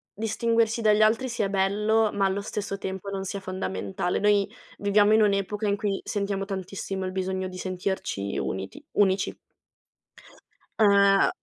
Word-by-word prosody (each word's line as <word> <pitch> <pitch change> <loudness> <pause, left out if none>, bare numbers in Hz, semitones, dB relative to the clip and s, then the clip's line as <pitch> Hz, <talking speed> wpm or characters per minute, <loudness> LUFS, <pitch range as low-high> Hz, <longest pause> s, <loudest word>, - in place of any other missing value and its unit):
distinguersi 230 +1 +1
dagli 215 -1 +4
altri 225 +4 +2
sia 225 -4 -1
bello, 210 +3 +2
ma 200 -1 +1
allo 195 +1 0
stesso 200 -1 -4
tempo 190 0 -5
non 195 -1 -3
sia 195 +1 -4
fondamentale. 140 - -3
Noi 205 -1 +2 0.3
viviamo 205 +1 +4
in 220 - +5
un'epoca 210 +1 +1
in 200 0 +1
cui 200 -2 -2
sentiamo 200 -1 -2
tantissimo 190 0 -4
il 185 - -3
bisogno 190 0 -2
di 185 0 -8
sentirci 185 - -3
uniti 95 0 -5
unici. 195 -1 +2 1.4
Ehm, 200 -2 +5
200 Hz, 140 wpm, -26 LUFS, 190-210 Hz, 1.4 s, in